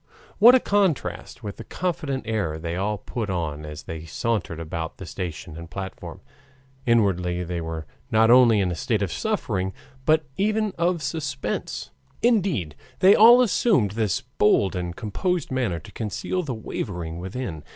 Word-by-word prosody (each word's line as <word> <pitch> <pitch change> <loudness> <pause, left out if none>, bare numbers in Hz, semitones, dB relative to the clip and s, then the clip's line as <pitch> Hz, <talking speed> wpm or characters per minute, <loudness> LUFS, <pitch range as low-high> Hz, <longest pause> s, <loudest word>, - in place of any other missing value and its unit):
What 240 +4 +9
a - - +6
contrast 190 - 0
with 100 -2 -6
the - - -7
confident 160 -7 -3
air 105 -9 -1
they 85 +1 -4
all 105 +3 -1
put 110 +1 -5
on 75 -4 -3
as 75 0 -8
they 80 -1 -7
sauntered 90 0 -2
about 80 0 -5
the 95 - -8
station 85 -2 -6
and 85 0 -9
platform! 95 +3 -7 0.7
Inwardly 90 -6 +2
they 85 0 -3
were 80 -1 -5 0.2
not 110 +1 +4
only 120 -4 +7
in 90 -2 0
a - - -2
state - - 0
of - - -2
suffering 95 0 -1 0.3
but 155 0 +3
even 215 +1 +1
of 170 -1 0
suspense. 135 -1 -3 0.3
Indeed 185 - +2 0.2
they 190 +2 +7
only 240 +3 +8
assumed 185 - +2
this 110 +2 0 0.2
bold 100 -2 +4
and 90 -1 -3
composed 170 - -2
manner 120 -10 0
to 80 - -11
conceal 110 - -3
the 140 -8 -4
wavering 85 -6 -5
within. 95 - -5
105 Hz, 160 wpm, -24 LUFS, -, 0.7 s, What